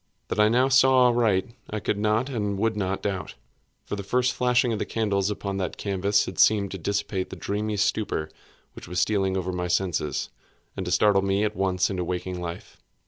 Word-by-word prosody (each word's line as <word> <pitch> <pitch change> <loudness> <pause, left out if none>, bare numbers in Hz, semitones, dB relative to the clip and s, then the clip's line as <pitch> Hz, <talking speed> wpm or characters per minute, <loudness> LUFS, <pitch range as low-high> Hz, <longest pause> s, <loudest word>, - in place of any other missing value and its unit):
That - - -2
I 105 0 +5
now 125 +3 +3
saw 130 -1 +5
aright 115 -2 +1 0.2
I 110 - -3
could 105 0 -2
not 110 +4 +1
and 105 -7 -2
would 110 +2 0
not 95 -2 -2
doubt; 95 -3 -3 0.5
for - - -4
the 100 - -5
first 125 +5 +1
flashing 125 -1 +2
of 110 - -3
the - - 0
candles 100 -3 0
upon 100 -1 -3
that 95 - -3
canvas 100 0 +1
had - - -7
seemed 100 -3 +4
to 95 - -6
dissipate 95 +1 -2
the - - -7
dreamy 105 +1 -3
stupor 100 -6 -1 0.4
which - - -11
was 90 0 -2
stealing 95 0 +1
over 95 0 -2
my 90 -1 -2
senses, 90 -5 -1 0.4
and 95 - -4
to - - -2
startle 100 +2 +4
me 100 +1 +1
at 105 0 -1
once 95 -1 +1
into 90 -2 -2
waking 90 +1 -4
life. 85 0 -7
100 Hz, 200 wpm, -25 LUFS, 95-110 Hz, 0.5 s, I